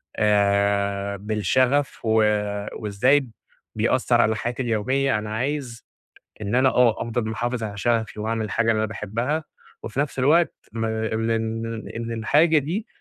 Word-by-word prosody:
آآ، 100 -1 +1
بالشَغَف 125 +7 +1
و 110 - +1 0.6
وإزاي 125 +6 +2 0.5
بيأثّر - - +2
على 110 0 +2
حياتي 120 +4 -3
اليومية. 130 +3 +1
أنا 105 0 -5
عايز 130 -2 -3 0.6
إن 105 +3 -1
أنا 130 +1 +5
آه، 125 -3 +3
أفضل 115 -1 -2
محافِظ 120 +2 -2
على 105 -1 -5
شَغَفي 110 -1 0
وأعمل 110 0 -1
الحاجة 115 +2 +1
اللي 110 - 0
أنا 110 - +1
باحبّها 115 +9 -2 0.4
وفي 115 +4 -5
نَفْس 145 -2 -1
الوقت 160 +6 +3 0.2
ما 110 -1 -2
إن 110 +1 -1
إن 115 0 -3
إن 115 0 -4
الحاجة 150 +9 +3
دي 175 - -2
115 Hz, 145 wpm, -23 LUFS, 105-130 Hz, 0.6 s, أنا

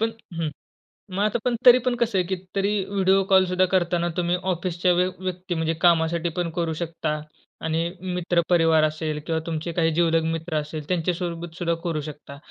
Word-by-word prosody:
पण 225 +1 +1 0.2
हं. 165 -2 -2 0.6
मग 190 +1 -2
आता 215 +2 +1
पण 245 -1 +2
तरी 245 0 +10
पण 250 -1 +2
कसं 235 -4 0
आहे 180 - +2
की 190 - 0 0.2
तरी 200 0 +1
व्हिडिओ 195 -1 +2
कॉल 190 -1 +6
सुद्धा 185 0 +2
करताना 175 -1 +2
तुम्ही 175 0 +1 0.2
ऑफिसच्या 180 0 0
व्य 180 +1 +2
व्यक्ती 185 -1 -4
म्हणजे 160 0 0
कामासाठी 170 0 +3
पण 175 -1 0
करू 165 -2 0
शकता. 155 -2 -2 0.4
आणि 160 +1 0 0.3
मित्र 175 -1 +1
परिवार 165 -3 +4
असेल 155 0 -1
किंवा 165 -1 0
तुमचे 165 0 -3
काही 165 -1 +2
जीवलग 165 0 +2
मित्र 165 0 -4
असेल 150 0 -4
त्यांच्या 180 -1 +1
सोबत 170 -1 -5
सुद्धा 170 -2 0
करू 165 -4 -1
शकता. 145 -1 -9
170 Hz, 185 wpm, -24 LUFS, 160-185 Hz, 0.6 s, तरी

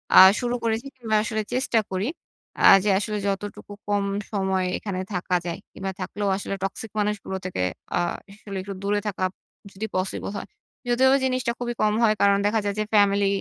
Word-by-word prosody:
আ - - +9 0.2
শুরু 245 0 0
করেছি 230 +3 -1
কিংবা 225 -4 -1
আসলে 220 0 -1
চেষ্টা 255 -2 +2
করি। 190 +3 -1 0.5
আ - - 0 0.2
যে, 210 - +1
আসলে 210 0 -2
যতটুকু 200 +1 -4
কম 205 -1 +1 0.3
সময় 190 -2 0
এখানে 195 -3 -4
থাকা 180 0 0
যায় 170 -1 -3
কিংবা, 195 0 -4
থাকলেও 200 +2 -3
আসলে 200 0 -4
টক্সিক 195 +2 -4
মানুষগুলো 205 -2 -1
থেকে 185 - -2 0.4
আ - - +2 0.3
আসলে 200 -1 -8
একটু 200 +1 -6
দূরে 205 +1 +1
থাকা 195 -2 -2 0.5
যদি 200 +3 -4
পসিবল 185 +1 -2
হয়। - - -6 0.4
যদিও 250 +2 +4
বা, - - +5
জিনিসটা 255 -2 0
খুবই 240 -1 -2
কম 210 0 +3
হয়। 215 -2 +5
কারণ 200 0 +5
দেখা 215 +2 +2
যায় 200 -1 -1
যে, - - +2
ফ্যামিলি 200 -1 +4
205 Hz, 185 wpm, -24 LUFS, 195-220 Hz, 0.5 s, আ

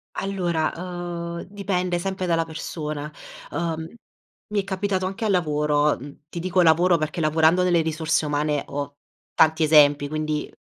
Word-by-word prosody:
Allora, 175 -5 -1
uhm, 175 -1 -5
dipende 185 -3 -1
sempre 190 +1 -3
dalla 165 -2 +2
persona, 155 -2 -5 0.4
uhm, 165 -1 -2 0.6
mi 210 - +1
è - - -11
capitato 190 -1 -1
anche 195 +4 -4
al 215 - +2
lavoro, 150 -4 +2
mhmm, 140 +3 -12
ti 170 - -6
dico 185 +1 +1
"lavoro" 170 +2 +5
perché 155 +1 -3
lavorando 160 +3 +3
nelle 175 -2 +3
risorse 160 0 0
umane 150 0 0
ho 145 0 -5 0.4
tanti 160 +1 +4
esempi. 145 -2 +5
Quindi, 155 0 -2
165 Hz, 145 wpm, -24 LUFS, 150-180 Hz, 0.6 s, lavoro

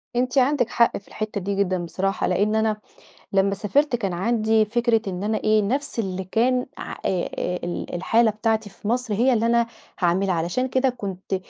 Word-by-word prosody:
أنتِ 250 +2 0
عندِك 260 -2 +3
حق 235 - +3
في 200 - -14
الحتة 215 -2 -4
دي 200 +2 -2
جدًا 185 -3 0
بصراحة، 195 +3 -1
لإن 205 +4 +1
أنا 220 -1 +1 0.6
لمّا 195 0 +3
سافرت 250 +7 +1
كان 195 -6 -2
عندي 220 +3 +2
فكرة 235 +1 +1
إن 185 +1 -3
أنا 215 +1 0
إيه 215 0 +3
نَفْس 265 +4 -2
اللي 190 -3 -2
كان 250 +6 +1
ع - - -6
آآ، 185 -2 0
آآ، 180 0 -2
ال 175 0 -4
الحالة 220 +5 +3
بتاعتي 220 0 -1
في 205 - -10
مصر، 240 -1 0
هي 245 +5 +3
اللي 230 0 +1
أنا 235 0 +3 0.3
هاعملها، 185 +1 +2
علشان 175 +10 -1
كده 260 +1 +2
كنت 195 -5 -4
215 Hz, 190 wpm, -23 LUFS, 195-235 Hz, 0.6 s, عندِك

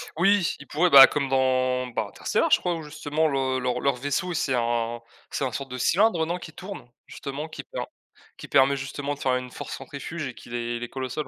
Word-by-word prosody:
Oui, 195 +1 +3
ils - - -12
pourraient, 175 +4 +2
bah, 135 -3 +11
comme 140 -2 -1
dans, 130 -1 +1
bah, 120 - -2
Interstellar, - - 0
je - - +6
crois 175 -1 -1
où 165 - -6
justement 150 +1 -1
le 135 -2 0
leur 125 -1 -1
leur 140 -1 +2
vaisseau, 145 +8 -2
c'est 150 -5 0
un 120 -1 -1 0.3
c'est - - -2
un 130 - -1
sorte 135 +3 -5
de 125 - -4
cylindre, 180 - +3
heu, - - 0
non, 175 +2 -2
qui 160 -3 -10
tourne? 185 -9 -9 0.2
Justement 140 +3 -6
qui 155 - -8
per - - -6 0.6
qui - - -9
permet, 140 +1 +4
justement, 140 +2 -4
de - - -18
faire 130 -1 +1
une 125 0 -4
force - - -7
centrifuge 140 +3 -6
et 130 - -6
qui 120 - -14
les 120 0 -3
les 120 0 -6
colle 130 -1 -5
au 130 - -6
sol. 150 +4 -4
135 Hz, 240 wpm, -25 LUFS, 125-155 Hz, 0.6 s, bah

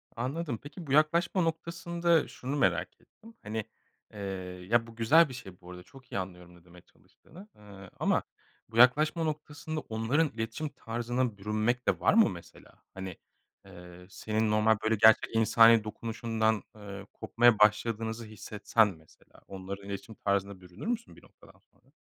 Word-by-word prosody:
Anladım 130 +2 -3
peki, 160 +3 -10
bu - - -6
yaklaşma 170 +5 +3
noktasında 170 0 0
şunu 130 +3 -5
merak 95 - 0
ettim; 230 +1 -18
hani, 110 +1 -4 0.5
eee, 105 - -10 0.5
ya 115 0 +3
bu 115 - -13
güzel 150 +8 +5
bir - - -8
şey 95 -8 -11
bu 90 - -12
arada, 90 0 -10
çok 130 +5 -18
iyi - - -3
anlıyorum 90 -1 -8
ne 85 -1 -21
demeye 90 0 -16
çalıştığını. 185 - -18
Iıı, 100 -2 -13
ama - - +1 0.5
bu 115 - -7
yaklaşma 150 +7 +5
noktasında 155 0 -4
onların 125 +6 0
iletişim 115 +7 -4
tarzına 120 -2 -3
bürünmek 110 +4 -1
de - - +2
var - - +3
mı 225 +1 +5
mesela? 85 -2 -12 0.2
Hani, 95 -2 -7 0.5
eee, 90 0 -13
senin 110 +2 -1
normal, 110 +1 +3
böyle 110 +1 +2
gerçek 110 +1 +5
insani 115 0 +6
dokunuşundan, 110 0 -2
ııı, 100 -2 -9
kopmaya 120 -2 +3
başladığınızı 110 +2 +1
hissetsen 110 +1 0
mesela 80 -5 -14
onların 100 +1 -8
iletişim 100 +3 -7
tarzına 100 -1 -2
bürünür 90 - -10
müsün 235 -1 -3
bir - - -18
noktadan - - -20
sonra? - - -31
115 Hz, 155 wpm, -29 LUFS, 100-140 Hz, 0.5 s, insani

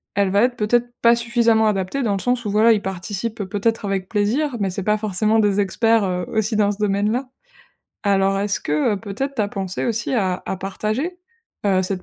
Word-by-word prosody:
elle 200 -1 +2
va 200 +4 +3
être, 250 0 +1
peut-être, 240 +3 +1
pas 235 0 +6
suffisamment 235 -2 +2
adaptée 210 +6 -1
dans 210 -3 +1
le - - -2
sens 245 -2 0
où, 205 - -1
voilà, 220 +2 +5
ils 210 - 0
participent, 200 +3 -4
peut-être, 210 +4 -1
avec 195 -2 -2
plaisir, 235 +7 0
mais 195 -1 0
c'est 185 +1 -4
pas 210 +1 +2
forcément 215 +2 +1
des 205 -1 +2
experts, 225 +2 +2
heu, 180 -2 -2
aussi 220 0 0
dans 205 -1 +3
ce 200 - -6
domaine-là. 210 +5 0 0.8
Alors 195 -1 +2
est-ce 200 0 -1
que, 150 +8 +1
heu, - - -3
peut-être, 225 +7 -4
tu 220 - 0
as 200 - -1
pensé 195 -2 -4
aussi 235 +3 -1
à 185 -5 0
à 190 - -2
partager, 215 - -3 0.5
heu, 190 -2 +3
cette 185 -1 -3
210 Hz, 210 wpm, -21 LUFS, 195-230 Hz, 0.8 s, pas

